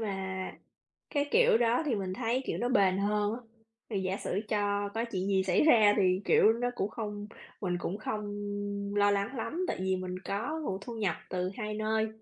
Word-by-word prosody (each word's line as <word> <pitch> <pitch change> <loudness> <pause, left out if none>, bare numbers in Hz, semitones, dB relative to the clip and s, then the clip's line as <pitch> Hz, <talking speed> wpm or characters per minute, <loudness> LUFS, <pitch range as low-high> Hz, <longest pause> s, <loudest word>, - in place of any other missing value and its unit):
mà 190 -3 -3 0.6
cái 290 -2 0
kiểu 465 - +5
đó 235 +2 +3
thì 270 - +2
mình 190 -3 -2
thấy, 245 +3 0
kiểu, - - -2
nó 240 - 0
bền 195 -7 +3
hơn 205 +1 +1
á. - - -5 0.5
Thì 200 -3 -1
giả 190 +1 -1
sử 200 - -2
cho 205 -1 0
có 225 +1 0
chuyện 190 -5 -3
gì 190 -1 +3
xảy 185 -1 +3
ra 220 -9 +6
thì, 185 -2 +3
kiểu, 220 - +6
nó 245 +2 -1
cũng 205 -3 -1
không 210 -2 -5 0.3
mình 180 -3 -1
cũng 180 +3 -3
không 215 0 -3 0.7
lo 205 0 +5
lắng 200 +6 0
lắm, 330 +9 -2
tại - - -1
vì 190 0 +1
mình 185 0 -4
có 225 +12 -3
nguồn 190 -8 -2
thu 230 +3 -7
nhập 200 -7 0 0.2
từ 180 0 -1
hai 215 -2 -3
nơi, 220 +1 0
205 Hz, 205 wpm, -30 LUFS, 190-230 Hz, 0.7 s, ra